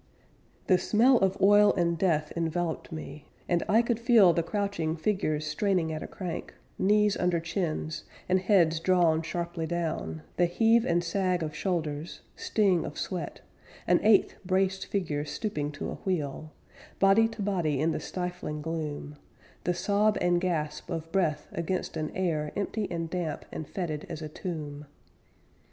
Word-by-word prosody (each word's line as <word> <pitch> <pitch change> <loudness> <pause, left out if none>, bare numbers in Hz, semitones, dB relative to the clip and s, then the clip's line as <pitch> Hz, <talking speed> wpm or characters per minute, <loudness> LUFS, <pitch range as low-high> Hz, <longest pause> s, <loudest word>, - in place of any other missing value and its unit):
The 185 -1 +4
smell 240 +4 +4
of 190 0 +1
oil 205 +1 +6
and 170 -2 +1
death 155 -4 +1
enveloped 170 +1 -2
me, 150 -2 -7 0.2
And 175 -1 +2
I 225 +3 +5
could 235 -1 0
feel 230 -7 +6
The 170 - +1
crouching 170 -3 -2
figures 155 -4 0
straining 165 +1 0
at 155 - -4
a - - -5
crank, 180 -4 -6 0.2
Knees 210 +1 +3
under 180 -1 +1
chins, 165 -2 -3 0.2
and 185 +1 +3
heads 175 -5 +3
drawn 170 -2 +3
sharply 170 0 -3
down, 155 - -3
The 175 - +4
heave 225 +6 +3
and 175 0 +2
sag 180 0 0
of 155 -1 -4
shoulders, 155 -3 -3
Sting 195 -6 +2
of - - -7
sweat; 175 -6 -4 0.4
An 180 0 +4
eighth 210 -2 +4
braced 190 +1 0
figure 155 -7 -1
stooping 150 -1 -3
to - - -5
a - - -4
wheel, 155 -4 -3 0.5
Body 200 +3 +5
to 225 -2 -6
body 170 -8 0
in 160 +3 +2
the 155 - -2
stifling 180 -4 -4
gloom, 150 -2 -4 0.5
The 180 - +1
sob 205 +3 +2
and 175 0 +2
gasp 155 -4 -2
of 165 -2 -4
breath 155 -6 0
against 170 +2 -3
an 155 -1 -2
air 160 -5 -1
Empty 205 +1 -2
and 165 -1 -3
damp 165 -3 -3
and 155 - -6
fetid 165 -2 -4
as 165 -2 -6
a 155 - -5
tomb. 150 -4 -6
175 Hz, 160 wpm, -28 LUFS, 155-195 Hz, 0.5 s, oil